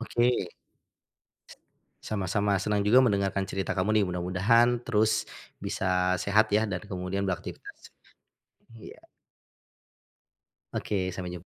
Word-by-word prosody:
Oke. 120 Hz, 0 st, +1 dB, 1.2 s
S -, -, -14 dB, 0.5 s
sama-sama, 100 Hz, 0 st, 0 dB
senang 105 Hz, +1 st, 0 dB
juga 115 Hz, +5 st, +6 dB
mendengarkan 100 Hz, -3 st, +1 dB
cerita 95 Hz, -1 st, -3 dB
kamu 95 Hz, +3 st, +1 dB
nih -, -, +2 dB
mudah-mudahan 100 Hz, +7 st, +2 dB
terus 110 Hz, -1 st, +2 dB, 0.4 s
bisa 90 Hz, -1 st, 0 dB
sehat 105 Hz, +3 st, +2 dB
ya 110 Hz, -, +2 dB
dan 90 Hz, -2 st, -3 dB
kemudian 95 Hz, -1 st, -4 dB
beraktivitas. 95 Hz, -3 st, -6 dB, 0.9 s
Iya. -, -, -12 dB, 1.7 s
Oke, 95 Hz, -3 st, -2 dB
sampai 90 Hz, -1 st, -5 dB
jum 85 Hz, -, -12 dB
100 Hz, 110 wpm, -28 LUFS, 95-110 Hz, 1.7 s, juga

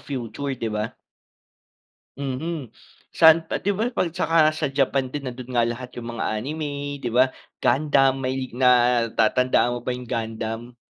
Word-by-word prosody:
future, 130 Hz, +1 st, -4 dB
di 110 Hz, -2 st, -3 dB
ba? 105 Hz, +1 st, -3 dB, 1.2 s
Mhm, 140 Hz, 0 st, -4 dB, 0.4 s
saan 160 Hz, 0 st, +6 dB
pa -, -, 0 dB
di 200 Hz, 0 st, 0 dB
ba 225 Hz, +5 st, -1 dB
pag 185 Hz, -, 0 dB
at 165 Hz, -, -7 dB
tsaka 165 Hz, -3 st, 0 dB, 0.2 s
sa 155 Hz, -1 st, -1 dB
Japan 135 Hz, -1 st, 0 dB
din 145 Hz, -1 st, -5 dB
nandoon 125 Hz, 0 st, -7 dB
nga 120 Hz, -2 st, +2 dB
lahat 125 Hz, +2 st, -5 dB
yung 120 Hz, 0 st, -6 dB
mga 115 Hz, -, -3 dB
anime, 150 Hz, +5 st, -4 dB, 0.3 s
di 120 Hz, -, -2 dB
ba? 130 Hz, +2 st, +3 dB, 0.2 s
Gundam 135 Hz, 0 st, +2 dB
may 130 Hz, +1 st, -1 dB, 0.2 s
natatandaan 120 Hz, -1 st, +3 dB
mo 120 Hz, -, -4 dB
ba -, -, -3 dB
yung 125 Hz, 0 st, -5 dB
Gundam? 115 Hz, 0 st, -4 dB
130 Hz, 160 wpm, -23 LUFS, 120-145 Hz, 1.2 s, saan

